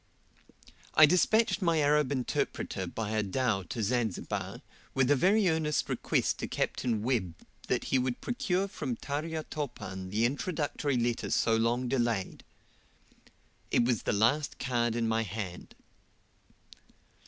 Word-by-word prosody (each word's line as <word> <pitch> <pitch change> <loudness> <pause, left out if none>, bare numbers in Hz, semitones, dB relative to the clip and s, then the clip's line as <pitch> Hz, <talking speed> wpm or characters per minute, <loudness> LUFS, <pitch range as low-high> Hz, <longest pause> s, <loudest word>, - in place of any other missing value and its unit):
I 155 - +10
despatched 190 +5 +3
my 170 -3 +2
Arab 150 -1 +3
interpreter 130 -3 -2
by 110 -2 -4
a 110 0 +1
dhow 105 0 0
to 120 -4 -3
Zanzibar, 115 -2 -2 0.3
with 135 0 +3
a - - +6
very 195 +8 +3
earnest 160 -2 0
request - - 0
to - - -3
Capt. - - -2
Webb 110 -6 0 0.3
that - - 0
he 130 - +1
would 125 -1 -1
procure 200 -7 -1
from 130 -10 -4
Tarya 155 +5 -3
Topan 95 -12 -5
the 110 +4 +1
introductory 145 0 -1
letter 120 0 -1
so 115 - +2
long 120 +3 +1
delayed. 120 -6 -1 1.3
It 120 - +3
was 120 -2 +1
the - - -1
last 115 +9 +2
card 120 -3 0
in 115 -1 0
my 110 0 +1
hand. 100 -3 -6
125 Hz, 135 wpm, -30 LUFS, 115-150 Hz, 1.3 s, I